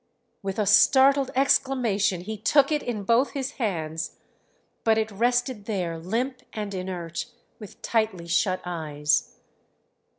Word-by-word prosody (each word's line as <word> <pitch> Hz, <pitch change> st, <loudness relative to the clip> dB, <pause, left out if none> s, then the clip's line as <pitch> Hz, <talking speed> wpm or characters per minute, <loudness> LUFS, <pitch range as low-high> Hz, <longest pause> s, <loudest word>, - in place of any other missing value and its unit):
With 195 Hz, -1 st, -4 dB
a 210 Hz, -, +1 dB
startled 265 Hz, +6 st, +5 dB
exclamation 245 Hz, -8 st, +2 dB
he 220 Hz, +4 st, -5 dB
took 275 Hz, +7 st, +3 dB
it 300 Hz, -1 st, +1 dB
in 215 Hz, -4 st, -4 dB
both 235 Hz, +6 st, +2 dB
his 275 Hz, -1 st, -3 dB
hands; 160 Hz, -7 st, -3 dB, 0.7 s
but 220 Hz, -1 st, +3 dB
it 220 Hz, 0 st, -1 dB
rested 245 Hz, +1 st, 0 dB
there 180 Hz, -6 st, -3 dB
limp 240 Hz, +10 st, -2 dB
and 210 Hz, -2 st, -4 dB
inert 180 Hz, -3 st, -4 dB, 0.3 s
with 210 Hz, -4 st, -11 dB
tightly 220 Hz, -7 st, 0 dB
shut 185 Hz, +2 st, +1 dB
eyes. 150 Hz, -4 st, -1 dB
215 Hz, 130 wpm, -25 LUFS, 185-250 Hz, 0.7 s, startled